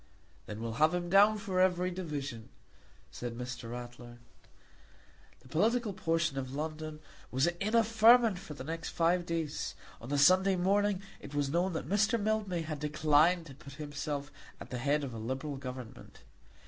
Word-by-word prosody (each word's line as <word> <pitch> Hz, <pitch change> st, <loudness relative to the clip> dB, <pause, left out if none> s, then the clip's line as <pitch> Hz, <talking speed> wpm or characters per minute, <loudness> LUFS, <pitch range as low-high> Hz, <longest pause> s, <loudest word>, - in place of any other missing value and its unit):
"Then 105 Hz, +1 st, -6 dB
we'll 115 Hz, 0 st, -4 dB
have 160 Hz, +3 st, +5 dB
him 175 Hz, -1 st, -3 dB
down 205 Hz, +2 st, +6 dB
for 200 Hz, -3 st, -2 dB
every 185 Hz, 0 st, +2 dB
division," 145 Hz, -10 st, -5 dB, 0.6 s
said 120 Hz, -1 st, -6 dB
Mr. 125 Hz, -1 st, -6 dB
Ratler. 120 Hz, 0 st, -8 dB, 1.2 s
The -, -, -18 dB
political 215 Hz, -, +1 dB
portion 165 Hz, -6 st, 0 dB
of 130 Hz, 0 st, -5 dB
London 155 Hz, 0 st, -5 dB, 0.3 s
was 130 Hz, +2 st, +2 dB
in 185 Hz, +6 st, -1 dB
a 230 Hz, -, +6 dB
ferment 225 Hz, -2 st, +5 dB
for 150 Hz, -, -9 dB
the 130 Hz, -, -7 dB
next 165 Hz, +3 st, -4 dB
five 175 Hz, +1 st, +1 dB
days. 165 Hz, -3 st, -3 dB, 0.3 s
On 115 Hz, -, -9 dB
the 145 Hz, -, 0 dB
Sunday 185 Hz, +6 st, +5 dB
morning 200 Hz, +2 st, +1 dB, 0.2 s
it 145 Hz, -, -10 dB
was 145 Hz, -1 st, 0 dB
known 175 Hz, +3 st, +1 dB
that 160 Hz, -, -4 dB
Mr. 215 Hz, +4 st, +2 dB
Mildmay 205 Hz, -5 st, -1 dB
had 155 Hz, -2 st, -5 dB
declined 155 Hz, +3 st, +3 dB
to 140 Hz, -, -11 dB
put 140 Hz, +1 st, -12 dB
himself 145 Hz, 0 st, -5 dB, 0.3 s
at -, -, -10 dB
the 125 Hz, -, -3 dB
head 145 Hz, +3 st, +1 dB
of 130 Hz, -4 st, -5 dB
a 115 Hz, -, -6 dB
liberal 130 Hz, +5 st, -4 dB
Government. 130 Hz, -3 st, -9 dB
155 Hz, 170 wpm, -32 LUFS, 135-185 Hz, 1.2 s, down